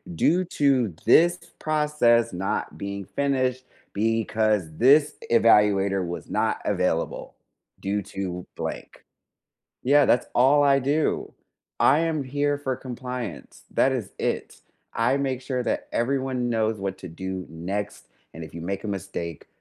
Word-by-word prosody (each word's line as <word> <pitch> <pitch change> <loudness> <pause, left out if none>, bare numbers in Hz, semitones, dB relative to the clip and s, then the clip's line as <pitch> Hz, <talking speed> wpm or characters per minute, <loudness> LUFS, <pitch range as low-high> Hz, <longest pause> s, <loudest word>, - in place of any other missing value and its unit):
due 175 - +3
to 135 -7 +3
this 175 +2 +5 0.2
process 150 -8 +2
not 95 +2 -2
being 100 0 -5
finished 130 -1 -1 0.3
because 110 -1 +1
this 145 +5 +5 0.2
evaluator 100 -4 +4
was 85 - -6
not 110 +1 0
available 90 -4 -1 0.5
due 100 +1 -1
to 90 -2 -5
blank." - - -6 0.8
Yeah. 145 +2 +5
That's 125 - +2
all 140 +4 +5
I 140 -1 +4
do. 145 +4 0 0.5
I 150 - +5
am 160 -3 0
here 145 +2 0
for 135 -2 -2
compliance. 125 - -7
That 135 - +3
is 125 -7 -3
it. - - -3 0.3
I 120 +4 +2
make 135 -2 -2
sure 130 -1 -2
that - - -2
everyone 130 0 -1
knows 110 -1 0
what 95 -1 -3
to 95 - -8
do 95 +2 -5
next, 95 +5 -5 0.3
and 80 - -8
if 80 - -11
you 85 - -7
make 95 +3 -4
a - - -3
mistake, 85 -4 -5
115 Hz, 140 wpm, -25 LUFS, 100-135 Hz, 0.8 s, this